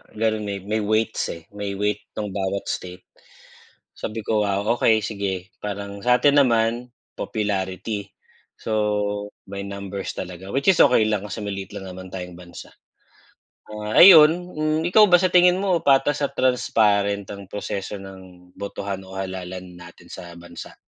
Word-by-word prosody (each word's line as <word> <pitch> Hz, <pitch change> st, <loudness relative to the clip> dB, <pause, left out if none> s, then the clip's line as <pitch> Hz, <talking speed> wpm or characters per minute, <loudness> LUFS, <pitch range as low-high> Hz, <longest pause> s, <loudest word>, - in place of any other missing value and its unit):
gano'n 110 Hz, -1 st, 0 dB
may 100 Hz, -1 st, -4 dB
may 110 Hz, +2 st, -1 dB
weights, 110 Hz, +1 st, 0 dB
eh, 85 Hz, -1 st, -9 dB
may 100 Hz, -1 st, -4 dB
weight 105 Hz, +1 st, -1 dB, 0.2 s
ng 105 Hz, -2 st, -3 dB
bawat 100 Hz, 0 st, -2 dB
state. 90 Hz, 0 st, -5 dB, 0.9 s
Sabi 110 Hz, 0 st, -6 dB
ko, 110 Hz, -1 st, +1 dB
"Wow, 100 Hz, 0 st, -1 dB
okey, 110 Hz, -2 st, +3 dB
sige, 95 Hz, -3 st, -4 dB
parang 100 Hz, -1 st, -5 dB
sa'tin 135 Hz, +4 st, +4 dB
naman, 120 Hz, -1 st, +1 dB, 0.2 s
popularity, 100 Hz, 0 st, -3 dB, 0.5 s
so 110 Hz, -, -6 dB, 0.8 s
may 100 Hz, 0 st, -6 dB
numbers 100 Hz, -1 st, -6 dB
talaga, 90 Hz, +1 st, -7 dB
which 140 Hz, +5 st, -1 dB
is 180 Hz, -, -2 dB
okey 125 Hz, -5 st, +5 dB
lang, 105 Hz, -2 st, -1 dB
kasi 105 Hz, +2 st, -6 dB
maliit 100 Hz, -1 st, -5 dB
lang 95 Hz, -1 st, -7 dB
naman 95 Hz, 0 st, -9 dB
tayong 90 Hz, -2 st, -7 dB
bansa." 85 Hz, -1 st, -12 dB, 1.0 s
Ah, 105 Hz, +4 st, +3 dB
ayun, 175 Hz, 0 st, +8 dB
hmm, 155 Hz, -1 st, -1 dB
ikaw 210 Hz, +5 st, +6 dB
ba 180 Hz, -, +3 dB
sa 185 Hz, +1 st, +1 dB
tingin 180 Hz, +1 st, +5 dB
mo 185 Hz, -3 st, +2 dB
patas 140 Hz, -1 st, +3 dB
at -, -, -14 dB
transparent 105 Hz, -5 st, +2 dB
ang 100 Hz, -1 st, -8 dB
proseso 100 Hz, 0 st, -5 dB
ng 95 Hz, -2 st, -13 dB
botohan 100 Hz, -1 st, -5 dB
o 95 Hz, -, -11 dB
halalan 95 Hz, -1 st, -6 dB
natin 85 Hz, 0 st, -14 dB
sa 85 Hz, -1 st, -9 dB
bansa? 85 Hz, 0 st, -11 dB
100 Hz, 150 wpm, -23 LUFS, 95-115 Hz, 1.0 s, ayun